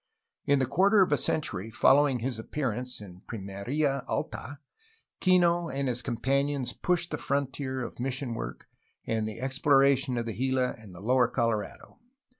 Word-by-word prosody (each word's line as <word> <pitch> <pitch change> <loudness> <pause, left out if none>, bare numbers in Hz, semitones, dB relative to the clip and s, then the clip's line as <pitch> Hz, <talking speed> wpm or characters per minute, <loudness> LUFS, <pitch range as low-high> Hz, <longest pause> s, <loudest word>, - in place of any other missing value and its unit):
In 140 - +4
the 135 - +2
quarter 195 - +4
of 185 - -2
a - - +5
century 110 - -2
following 135 +3 +4
his 120 -2 -3
appearance 125 -1 -3
in 90 -3 -11
Pimerla 120 +7 -2
Alta, 140 +5 -4 0.6
Kino 175 -2 +3
and 135 +1 -2
his 125 -1 0
companions 135 +2 -1
pushed 175 -1 -1
the - - -3
frontier 135 -1 -2
of 120 - -8
mission 130 0 -2
work 115 - -6 0.4
and 110 -1 -1
exploration 135 +2 +2
to 120 - -1
the 115 -1 -4
Gila 130 +1 0
and 100 -5 -13
the 90 - -10
lower 125 +3 +3
Colorado. 115 - -2
130 Hz, 150 wpm, -28 LUFS, 115-140 Hz, 0.6 s, a